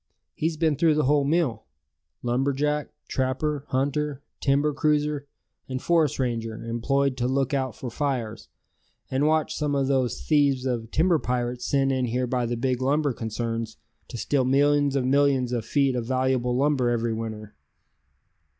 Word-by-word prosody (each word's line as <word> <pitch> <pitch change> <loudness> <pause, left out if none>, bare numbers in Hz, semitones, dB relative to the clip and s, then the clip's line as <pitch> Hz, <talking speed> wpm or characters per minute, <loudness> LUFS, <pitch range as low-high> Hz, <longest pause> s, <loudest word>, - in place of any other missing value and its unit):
He's 160 0 -2
been 155 -3 +1
through 160 0 +3
the 150 - +2
whole 145 +1 +3
mill 140 -8 0 0.6
lumber 130 +3 +1
jack, 150 +2 -1 0.2
trapper, 140 +2 -1
hunter, 145 +1 -1 0.2
timber 145 +2 +2
cruiser; 150 -1 0 0.4
and 130 0 -2
forest 160 -2 +2
ranger 115 -3 -2
employed 135 +4 0
to 125 0 0
look 135 +1 0
out 130 -4 -1
for 125 - -6
fires, 120 -6 -3 0.6
and 135 +3 +2
watch 155 -1 +1
some 150 -2 -1
of 135 -1 +1
those 130 -3 0
thieves 140 -4 +2
of 120 -4 -2
timber 165 +2 +2
pirates 125 -1 -2
sent 135 -1 +2
in 130 -1 0
here 125 +2 -1
by 125 -1 -1
the 120 0 -2
big 125 +1 -1
lumber 145 +1 +1
concerns 115 0 -4 0.3
to 120 - -7
steal 135 +3 +1
millions 145 +2 +3
of 130 -2 +1
millions 135 -2 +2
of 120 -3 -2
feet 140 -1 +1
of 120 -2 -3
valuable 130 -1 +1
lumber 135 -3 +2
every 120 -1 0
winter." 110 -2 -6
135 Hz, 160 wpm, -25 LUFS, 120-145 Hz, 0.6 s, through